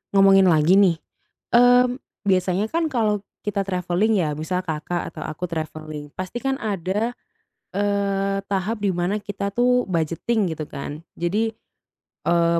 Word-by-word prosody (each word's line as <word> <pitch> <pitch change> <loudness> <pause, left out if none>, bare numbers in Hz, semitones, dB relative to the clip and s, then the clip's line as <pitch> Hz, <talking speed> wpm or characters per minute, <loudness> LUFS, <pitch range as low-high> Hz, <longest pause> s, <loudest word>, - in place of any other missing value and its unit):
ngomongin 195 -1 +7
lagi 160 +1 +5
nih. 185 -4 +5 0.6
Mmm, 245 +1 +5 0.3
biasanya 185 +1 +2
kan 330 -1 +1
kalau 215 -5 +1 0.2
kita 205 -1 -1
travelling 185 +4 +1
ya. 155 -5 +1
Misal 180 +4 -2
Kakak 165 +1 -3
atau 155 - -8
aku 160 +4 -4
travelling, 155 -2 -5
pastikan 240 +9 -2
ada, 205 +2 -1 0.6
eee, 200 0 0
tahap 200 +3 -1
di 195 - +2
mana 175 +3 0
kita 200 -1 -4
tuh 250 -1 +3
budgeting 175 +4 0
gitu 155 -1 -5
kan. 145 +2 -6 0.2
Jadi, 205 +7 0 0.8
eee, 170 0 +3
195 Hz, 135 wpm, -23 LUFS, 170-210 Hz, 0.8 s, ngomongin